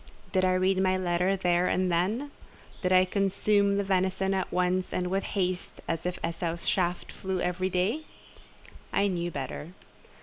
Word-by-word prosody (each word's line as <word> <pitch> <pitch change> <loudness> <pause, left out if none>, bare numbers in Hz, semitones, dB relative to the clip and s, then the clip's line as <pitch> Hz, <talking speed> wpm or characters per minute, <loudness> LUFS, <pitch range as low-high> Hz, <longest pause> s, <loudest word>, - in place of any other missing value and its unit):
Did 185 -1 +2
I 185 0 +3
read 185 +1 +2
my 185 0 +2
letter 180 +1 +1
there 180 -1 +2
and 185 -1 +1
then? 210 +12 0 0.5
Did 185 - 0
I 185 0 +6
consume 200 +1 +2
the 200 - +1
venison 190 0 +1
at 190 -1 -1
once 180 +1 0
and 180 0 -1
with 195 +1 +1
haste, 185 -2 -2
as 165 +1 -2
if 180 - -3
Esau's 170 0 -3
shaft 180 -2 0
flew 190 -1 -3
every 180 +1 0
day? 195 - 0 0.9
I 200 - +2
knew 175 -2 -1
better. 150 +2 -6
185 Hz, 165 wpm, -28 LUFS, 180-190 Hz, 0.9 s, I